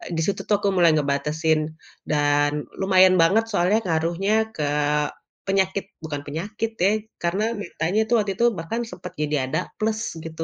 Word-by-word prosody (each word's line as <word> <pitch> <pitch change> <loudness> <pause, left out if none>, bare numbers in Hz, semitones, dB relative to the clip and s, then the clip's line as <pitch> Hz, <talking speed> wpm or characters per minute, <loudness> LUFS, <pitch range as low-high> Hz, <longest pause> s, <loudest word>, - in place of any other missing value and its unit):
di 160 - 0
situ 200 - -1
tuh 205 - +3
aku 205 - +1
mulai 175 -2 +5
ngebatasin 150 +2 0 0.4
dan 145 -1 +2 0.3
lumayan 185 -1 +5
banget 200 +7 +4
soalnya 200 +2 +3
ngaruhnya 185 +7 +1
ke 155 - -2 0.8
penyakit 195 0 +1 0.2
bukan 145 -3 -4
penyakit 205 +9 -3
ya, 195 - +5 0.3
karena 185 +5 0 0.2
matanya 180 +1 -1
itu 235 - -1
waktu 205 -3 0
itu 235 - +3
bahkan 165 +9 -3
sempet 180 0 -9
jadi 150 0 0
ada - - 0 0.2
plus, 220 0 0 0.2
gitu. 165 0 -5
175 Hz, 155 wpm, -23 LUFS, 160-205 Hz, 0.8 s, mulai